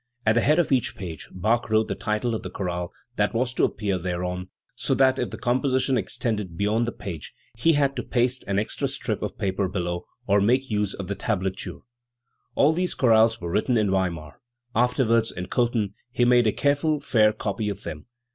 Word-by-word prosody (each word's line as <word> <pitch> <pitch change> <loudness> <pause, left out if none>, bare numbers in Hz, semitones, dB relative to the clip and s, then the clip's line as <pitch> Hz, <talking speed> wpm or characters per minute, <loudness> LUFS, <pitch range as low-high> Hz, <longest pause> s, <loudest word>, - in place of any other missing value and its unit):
At 110 - +5
the 120 - +3
head 150 +5 +3
of 175 -4 +2
each 130 -4 +1
page 85 -5 -7
Bach 110 +6 0
wrote 110 0 +3
the - - -1
title 110 +3 -1
of 110 - -2
the - - -6
chorale 90 -2 -3 0.3
that - - +1
was 125 +2 0
to - - +3
appear 100 -3 -1
thereon, 90 +1 -3 0.2
so - - 0
that 130 -1 +4
if 125 - -1
the - - -7
composition 130 +1 +1
extended 105 -9 -2
beyond 110 +4 +1
the - - -1
page 85 -10 -7 0.2
he 145 +9 +3
had 140 -2 +2
to - - 0
paste 125 0 0
an 100 0 0
extra 105 - -1
strip - - -3
of - - -4
paper 95 0 0
below, 85 -2 -3 0.2
or 100 -1 +3
make 125 +5 +2
use 105 -2 0
of 95 - -6
the 100 - -1
tablature. 95 -2 -3 0.7
All 150 +3 +4
these 180 +2 -1
chorales 115 -2 +4
were 85 -1 -4
written 120 +6 +2
in 105 -3 +2
Weimar. 85 -6 -2 0.3
Afterwards, 115 -1 +2
in 90 0 -6
Cothen, 115 -5 0 0.2
he 120 -1 +2
made 120 -1 +5
a - - +4
careful 145 +4 +1
fail 110 -6 +3
copy 105 0 -3
oi - - -4
them. 100 +3 -8
110 Hz, 200 wpm, -25 LUFS, 95-125 Hz, 0.7 s, At